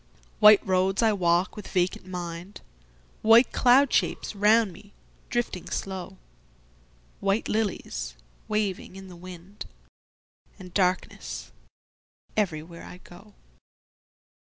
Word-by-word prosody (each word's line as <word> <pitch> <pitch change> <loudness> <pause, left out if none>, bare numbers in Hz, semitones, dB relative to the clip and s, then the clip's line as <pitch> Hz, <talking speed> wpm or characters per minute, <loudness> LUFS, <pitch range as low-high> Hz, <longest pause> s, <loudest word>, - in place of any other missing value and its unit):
White 210 -1 +7
roads 190 +3 +1
I 220 -1 +4
walk 175 0 +1
with 210 - -8
vacant 180 0 -1
mind, 175 +1 -7 0.6
White 225 +3 +6
cloud 255 +2 +4
shapes - - 0
round 210 0 +4
me 205 +3 -16 0.4
drifting 240 -7 -3
slow, 190 0 -5 1.0
White 195 +2 0
lilies 190 - -2 0.3
waving 210 -3 -2
in 190 0 -10
the 180 - -11
wind—And 180 +1 -14
darkness 185 -1 -1 0.8
everywhere 170 -5 -2
I 180 - -10
go. 195 +3 -16
190 Hz, 100 wpm, -26 LUFS, 180-210 Hz, 1.0 s, White